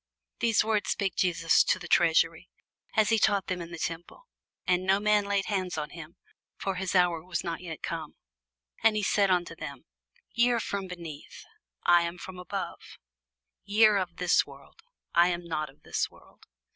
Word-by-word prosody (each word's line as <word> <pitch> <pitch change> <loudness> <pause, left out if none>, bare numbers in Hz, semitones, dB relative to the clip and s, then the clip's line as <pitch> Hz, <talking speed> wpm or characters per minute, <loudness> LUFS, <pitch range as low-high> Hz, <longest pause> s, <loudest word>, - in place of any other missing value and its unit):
These 225 -3 +3
words 215 -1 0
spake 195 -3 -1
Jesus 170 -2 +3
in - - -11
the - - -8
treasury, - - +3 0.5
as 215 -2 +4
he 225 -1 +3
taught 200 -2 +2
in 180 - -1
the 170 0 -7
temple: 165 - -5 0.4
and 180 0 +2
no 190 +1 +3
man 210 0 +3
laid 200 -1 0
hands 185 -5 -2
on 150 -1 -4
him; 165 -1 -10 0.4
for 195 - -2
his 185 +1 -3
hour 175 -3 +3
was 180 -1 -3
not 170 0 -4
yet 165 -3 -8
come. - - -5 0.7
And 225 -1 +4
he 210 - 0
said 200 0 +3
unto 175 -2 +1
them, 140 -5 -8 0.5
Ye 235 +1 +4
are 235 - +1
from 200 -3 -3
beneath; 170 -5 -9 0.4
I 175 0 +6
am 170 +1 -3
from 185 +1 -9
above: 180 - -6 0.7
ye 210 +2 +4
are 210 -1 +5
of 180 -2 -4
this 180 0 +3
world; - - -16 0.3
I 170 +1 +6
am 175 -1 -2
not 155 -3 -3
of 135 - -21
this - - -1
world. - - -21
180 Hz, 185 wpm, -28 LUFS, 170-200 Hz, 0.7 s, I